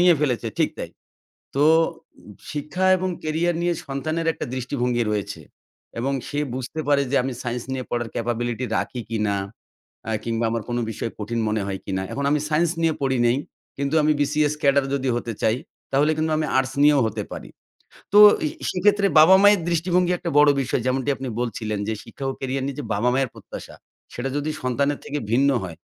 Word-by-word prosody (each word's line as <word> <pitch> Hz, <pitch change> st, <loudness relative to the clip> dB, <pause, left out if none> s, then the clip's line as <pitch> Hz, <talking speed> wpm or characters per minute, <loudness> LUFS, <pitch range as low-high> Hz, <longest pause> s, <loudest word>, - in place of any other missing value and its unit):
নিয়ে 175 Hz, -1 st, +6 dB
ফেলেছে, 125 Hz, -6 st, 0 dB
ঠিক -, -, +2 dB
তাই। -, -, -5 dB, 0.6 s
তো 140 Hz, -, +2 dB, 0.6 s
উম 105 Hz, -, -13 dB, 0.2 s
শিক্ষা 150 Hz, +5 st, -3 dB
এবং 185 Hz, +1 st, -2 dB
ক্যারিয়ার 160 Hz, +2 st, 0 dB
নিয়ে 175 Hz, -, +2 dB
সন্তানের 155 Hz, +4 st, -2 dB
একটা -, -, -5 dB
দৃষ্টিভঙ্গি 125 Hz, -2 st, -1 dB
রয়েছে 105 Hz, -2 st, -3 dB, 0.6 s
এবং 135 Hz, +4 st, -1 dB, 0.2 s
সে 145 Hz, -, -4 dB, 0.2 s
বুঝতে 130 Hz, +5 st, -4 dB
পারে 140 Hz, -1 st, +4 dB
যে 140 Hz, -, +1 dB
আমি 130 Hz, -, -3 dB
সাইন্স 120 Hz, -1 st, -3 dB
নিয়ে 130 Hz, -1 st, -3 dB
পড়ার 120 Hz, -1 st, -2 dB
ক্যাপাবিলিটি 120 Hz, +1 st, -2 dB
রাখি 125 Hz, -, -2 dB
কিনা 105 Hz, -3 st, 0 dB, 0.7 s
অ্যা 110 Hz, -, -1 dB
কিংবা 115 Hz, 0 st, -1 dB
আমার 115 Hz, -1 st, -2 dB
কোনো 120 Hz, 0 st, -1 dB
বিষয় 115 Hz, +1 st, -4 dB
কঠিন 115 Hz, +2 st, -2 dB
মনে 110 Hz, -1 st, 0 dB
হয় 95 Hz, -1 st, -3 dB
কিনা। 95 Hz, -1 st, -2 dB
এখন 140 Hz, -, -3 dB
আমি 150 Hz, 0 st, +2 dB
সায়েন্স 160 Hz, +2 st, +2 dB
নিয়ে 160 Hz, -2 st, +2 dB
পড়ি 130 Hz, -2 st, +1 dB
নাই 120 Hz, -, +3 dB, 0.4 s
কিন্তু 140 Hz, +2 st, -1 dB
আমি 155 Hz, +1 st, +4 dB
BCS 150 Hz, +1 st, +2 dB
ক্যাডার 140 Hz, -1 st, +4 dB
যদি 135 Hz, -1 st, -1 dB
হতে 120 Hz, -1 st, -3 dB
চাই, 110 Hz, +1 st, +3 dB, 0.4 s
তাহলে 145 Hz, +3 st, +3 dB
কিন্তু 155 Hz, 0 st, 0 dB
আমি 155 Hz, -, 0 dB
আর্টস 130 Hz, 0 st, 0 dB
নিয়েও 145 Hz, -1 st, +6 dB
হতে 110 Hz, -1 st, -3 dB
পারি। -, -, -7 dB, 0.7 s
তো 205 Hz, -, +8 dB, 0.3 s
এ -, -, +2 dB, 0.2 s
সেক্ষেত্রে 200 Hz, +2 st, +3 dB
বাবা-মায়ের 190 Hz, +4 st, +7 dB
দৃষ্টিভঙ্গি 175 Hz, +1 st, +1 dB
একটা 175 Hz, -1 st, -4 dB
বড় 150 Hz, 0 st, +7 dB
বিষয় 130 Hz, -1 st, -1 dB
যেমনটি 130 Hz, +1 st, 0 dB
আপনি 135 Hz, -, -6 dB
বলছিলেন 110 Hz, -3 st, -3 dB
যে 110 Hz, -, 0 dB
শিক্ষা 120 Hz, +4 st, -8 dB
ও -, -, -2 dB
ক্যারিয়ার 135 Hz, 0 st, -2 dB
নিয়ে 140 Hz, -1 st, -4 dB
যে -, -, -5 dB
বাবা-মায়ের 125 Hz, +5 st, +1 dB
প্রত্যাশা, -, -, -10 dB, 0.4 s
সেটা 130 Hz, +3 st, -3 dB
যদি 145 Hz, +1 st, -2 dB
সন্তানের 140 Hz, +3 st, 0 dB
থেকে 145 Hz, +1 st, -3 dB
ভিন্ন 135 Hz, +4 st, +4 dB
হয়, 85 Hz, -3 st, -7 dB
135 Hz, 185 wpm, -23 LUFS, 120-150 Hz, 0.7 s, তো